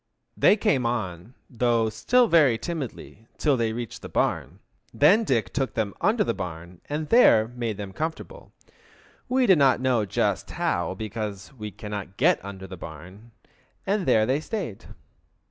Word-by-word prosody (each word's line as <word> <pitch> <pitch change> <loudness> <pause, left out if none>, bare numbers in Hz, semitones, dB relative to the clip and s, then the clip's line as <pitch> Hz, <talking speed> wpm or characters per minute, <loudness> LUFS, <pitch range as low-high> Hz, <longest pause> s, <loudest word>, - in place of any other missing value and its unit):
They 210 - +5
came 200 - +1
on, 110 -2 -4
though 115 -2 +1
still 240 - +3
very 150 - +4
timidly, 125 -6 -7
till 145 -3 +2
they 115 -3 0
reached 115 0 -6
the - - -8
barn. - - -1 0.3
Then 195 +10 +4
Dick 115 - 0
took 135 -2 -2
them 110 -4 -1
under 215 0 +2
the - - -1
barn 85 -2 -7
and 150 +1 -3
there 110 - +6
he 120 - -16
made 115 -4 -3
them 100 -2 -7
comfortable, 165 - -6 0.8
we 255 0 +3
do 190 - +6
not 135 -5 +4
know 125 -5 +1
just - - -1
how, 85 +1 -1
because 105 0 -6
we 105 -5 -7
cannot 100 -2 -7
get 170 +7 +3
under 95 -1 -8
the 95 -1 -9
barn, 90 +8 -11 0.6
and 200 -1 0
there 110 -1 +4
they 130 +5 +1
stayed. 165 - -5
115 Hz, 160 wpm, -25 LUFS, 100-155 Hz, 0.8 s, there